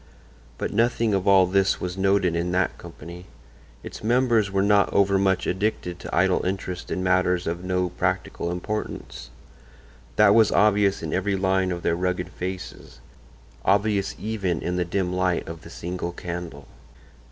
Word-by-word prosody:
But - - -3
nothing 115 0 +1
of 95 0 0
all 95 -1 +6
this 95 +1 +1
was 90 0 -4
noted 95 -2 +2
in 85 +1 -1
that 90 -2 +1
company; 85 +3 -11 0.6
its - - -9
members 115 -2 +2
were 95 0 +1
not 100 0 +3
overmuch 95 -1 +2
addicted 90 -2 -2
to - - -5
idle 95 0 +2
interest 90 -1 -4
in 95 - -2
matters 90 -1 +2
of 85 +2 -3
no 90 -1 0
practical 85 0 -2
importance; 105 +5 -5 0.9
that 105 -1 +6
was 110 -1 +5
obvious 100 -2 +3
in 80 - -3
every 95 +1 0
line 95 -1 +1
of 85 -1 -4
their 85 - +1
rugged 90 0 -2
faces—obvious 95 - -4
even 100 -6 -2
in 90 - -2
the 90 -1 0
dim 90 +1 -1
light 90 -1 0
of 80 0 -8
the - - -12
single 85 0 -5
candle. 85 -5 -7
95 Hz, 150 wpm, -24 LUFS, 90-100 Hz, 0.9 s, all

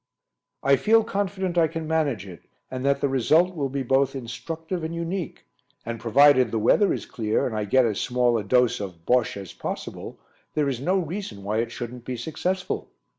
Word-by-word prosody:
"I 140 0 +5
feel 225 +6 +4
confident 190 -3 -1
I 165 - +5
can 160 0 -5
manage 150 - 0
it, 90 -4 -12 0.3
and 130 0 -4
that 140 0 +2
the - - +3
result 155 +8 +3
will 140 -4 -1
be 135 0 -2
both 135 +2 +2
instructive 160 +8 -5
and 160 +1 -3
unique, 170 0 -4 0.4
and 115 0 -4
provided 130 +2 +5
the 115 - -1
weather 155 - +4
is - - -2
clear 110 -4 -1
and 115 - -2
I 105 -1 -1
get 130 +5 +4
as 110 -4 -1
small 125 -1 +2
a - - -4
dose 125 +4 +3
of 90 -5 -7
'Bosche' 125 -4 +2
as 95 -3 -8
possible, - - -6 0.4
there 150 -2 +2
is 130 -3 -2
no 185 +7 +2
reason 170 - -4
why 105 +2 -1
it 115 - -2
shouldn't 120 -1 -7
be 125 0 -4
successful." 180 +8 -3
135 Hz, 195 wpm, -25 LUFS, 115-165 Hz, 0.4 s, I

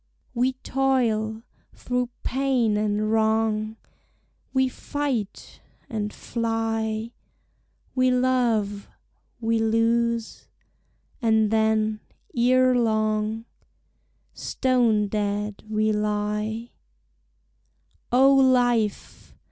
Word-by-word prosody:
We 255 +2 +1
toil 240 -5 0 0.3
through 250 -1 -2
pain 255 -5 +1
and 210 0 0
wrong; 220 0 +1 0.7
We 260 -1 +2
fight 255 -6 -4 0.3
and 210 -2 -2
fly; 225 -1 -2 0.8
We 255 0 +3
love; 240 -5 +1 0.5
we 225 -1 0
lose; 230 +1 0 0.7
and 220 -2 +3
then, 220 -1 +1 0.4
ere 255 +1 +4
long, 215 -1 0 0.9
Stone 235 -5 +1
dead 205 0 -2
we 215 0 +1
lie, 210 +2 -2 1.4
O 265 +3 +6
life! 245 -5 +1
225 Hz, 75 wpm, -24 LUFS, 215-250 Hz, 1.4 s, O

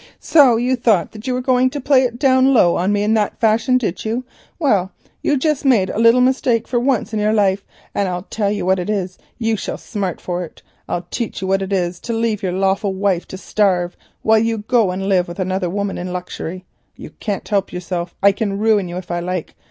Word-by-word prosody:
"So 275 -7 +5
you 250 +2 +1
thought 225 -7 +2
that 215 +3 -10
you 255 - 0
were 250 - -1
going 255 0 +3
to 285 - -5
play 270 -1 +4
it 240 -2 -1
down 260 0 +4
low 175 -7 +5
on 185 +3 +1
me 205 0 +1
in 215 +1 +2
that 215 -2 0
fashion, 230 +3 +3
did 210 -8 -3
you? 230 +3 -2 0.3
Well, 205 - +1 0.3
you've 290 -3 +1
just 305 -1 0
made 230 -9 +3
a - - -3
little 230 +2 +5
mistake 250 -3 +2
for 245 - 0
once 245 -3 0
in 215 - 0
your 210 +1 +2
life, 200 -2 +2 0.3
and 200 -2 0
I'll 180 0 -3
tell 205 0 -2
you 205 -2 -2
what 190 0 +2
it 180 - -4
is, 190 -3 -2 0.2
you 225 -2 0
shall - - -4
smart 195 -6 -4
for 180 0 -3
it. 165 - -12 0.3
I'll 175 - -2
teach 230 -5 -4
you - - -2
what 195 +1 +1
it 190 0 -4
is 175 -2 -1
to 235 - -4
leave 225 -2 0
your 185 -3 -1
lawful 195 +2 0
wife 190 -3 0
to 190 - -8
starve 185 -3 0 0.3
while 220 0 +4
you 225 0 0
go 230 -6 +3
and 190 +2 -3
live 185 -3 +2
with 175 - -8
another 185 -1 -1
woman 200 +2 -3
in 180 +1 -5
luxury. 180 0 -6 0.3
You - - -10
can't 205 -3 -3
help 200 -2 0
yourself; 180 -1 -4
I 200 - +7
can 200 -1 -2
ruin 210 -3 +2
you 175 +1 -6
if 180 -1 -7
I 175 - -1
like. 180 -1 -4
205 Hz, 235 wpm, -19 LUFS, 185-235 Hz, 0.3 s, I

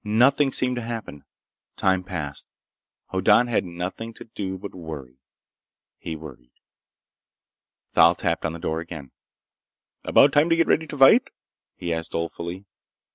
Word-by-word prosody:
Nothing 130 +6 +3
seemed 125 -1 0
to - - -2
happen. 115 -11 -7 0.5
Time 95 -1 +1
passed. 80 -7 -6 0.6
Hoddan 105 +5 +4
had 120 -2 0
nothing 90 +6 -6
to - - -10
do 95 -4 -5
but 100 +2 -8
worry. 75 -7 -9 0.8
He 80 - -5
worried. 70 -6 -11 1.4
Thal 85 +2 +6
tapped 85 -1 -1
on 80 - -2
the - - -6
door 80 -1 -2
again. 80 -6 -8 0.9
"About 135 - +5
time 150 +3 +4
to 165 - +4
get 165 0 +3
ready 160 +1 +1
to 150 - -7
fight?" 135 - +6 0.5
he 85 -1 -3
asked 80 0 -5
dolefully. 85 +3 -4
95 Hz, 140 wpm, -24 LUFS, 80-120 Hz, 1.4 s, Thal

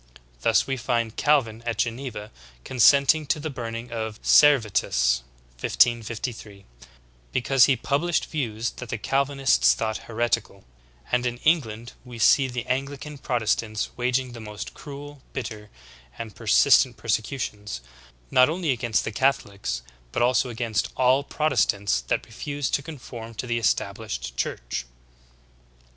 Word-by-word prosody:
Thus - - +3
we 135 -1 -2
find 115 -1 -1
Calvin 125 -7 +2
at 120 -2 -2
Geneva 115 -3 -3 0.3
consenting 140 +4 +4
to 150 - +1
the 155 +1 -4
burn 115 -3 -5
ing 115 +1 -7
of 110 -2 -4
Servetus 100 - +4 0.4
(1553) 115 - 0 0.7
because 130 +1 +4
he 135 - +3
published 150 +7 0
views 120 -6 -3
that 125 - -9
the 110 - -2
Calvinists 135 - +2
thought 110 - -2
heretical; 115 -3 -1 0.5
and 125 0 +2
in 120 0 -3
England 120 -8 +1
we 125 -2 -10
see 135 +4 +5
the 125 -1 -3
x\n 130 +2 0
glican 145 0 -9
Protestants 110 -2 -1
waging 125 +1 0
the 120 - -9
most 105 -2 -7
cruel, 145 -1 -10
bitter, 110 -5 -6 0.5
and 110 -3 -7
persist - - +5
ent - - -12
persecutions, 105 - -3 0.5
not 130 +2 +6
only 165 -2 0
against 120 -3 0
the - - -3
Catholics 100 - -1 0.3
but 120 - +1
also 125 +1 +2
against 115 -2 -1
all 130 +2 +4
Protestants 100 - +1
that - - 0
refused 145 +5 -4
to - - +2
conform 120 -6 -9
to 110 - -4
the 120 -1 -1
Estab 100 -2 0
lished 65 - -5
Church."' - - -3
120 Hz, 140 wpm, -25 LUFS, 110-135 Hz, 0.7 s, not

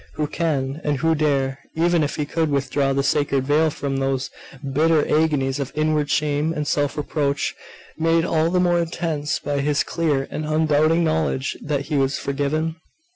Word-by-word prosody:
Who 150 - 0
can 150 -2 -2
and 145 -2 0
who 160 +3 +2
dare, 140 -3 0 0.2
even 170 +1 +2
if 150 -1 -1
he 150 - -2
could 160 +1 -1
withdraw 140 0 0
the 135 0 +1
sacred 140 -1 +1
veil 150 +3 +3
from 140 -2 -3
those 135 -1 -1 0.4
bitter 160 +2 +3
agonies 145 -3 +1
of 140 -1 -3
inward 155 -1 +1
shame 150 +2 +1
and 150 -2 -2
self 145 0 0
reproach, 145 -1 -1 0.5
made 165 +1 +2
all 160 -1 +1
the 180 +1 +1
more 175 -1 +3
intense 165 -3 -2
by 145 0 -2
his 145 +1 +1
clear 150 -5 -1
and 155 - -3
undoubting 155 +1 +2
knowledge 155 -4 0
that 145 -1 -1
he 145 +1 -2
was 135 0 +1
forgiven? 155 +4 -2
150 Hz, 175 wpm, -22 LUFS, 140-160 Hz, 0.5 s, veil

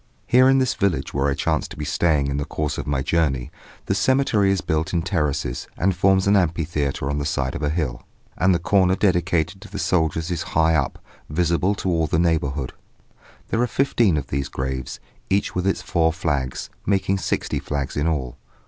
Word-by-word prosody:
Here 130 +2 +5
in 135 - +5
this 130 -1 +2
village 100 -5 -1
where 70 0 +1
I 70 - 0
chance - - 0
to - - -11
be 75 - -4
staying 75 -3 +1
in 70 0 -2
the 70 - -1
course 75 -1 -3
of - - -5
my 70 -2 0
journey, 70 -4 0 0.3
the - - 0
cemetery 110 -2 +2
is 95 - +1
built 80 +2 -1
in 85 - +1
terraces, 70 -5 -1
and 95 +1 +1
forms 95 +1 +3
an 100 +1 +4
amphitheatre 80 -6 0
on 70 +1 -1
the - - -2
side 70 -3 -1
of - - -5
a 75 - 0
hill, 75 -7 -2 0.3
and 95 +2 +3
the 90 - +3
corner 95 +2 +3
dedicated 90 -1 +1
to 105 - -11
the 100 - -6
soldiers 80 -1 0
is 85 - -2 0.2
high 80 0 +4
up, 75 -4 0 0.3
visible 85 +5 +1
to 100 - -4
all 80 -2 +1
the 80 - 0
neighbourhood. 75 -5 0 0.8
There 115 - +1
are 125 - +2
fifteen 120 - +2
of 70 - -2
these 70 0 -2
graves, 65 -1 -4 0.3
each 100 +1 +1
with 90 +1 -1
its 95 - 0
four 80 -2 +2
flags, 75 -6 -2
making 95 -1 +1
sixty - - -1
flags 70 -2 -3
in 75 +2 0
all. 70 -5 -2
80 Hz, 200 wpm, -22 LUFS, 70-95 Hz, 0.8 s, Here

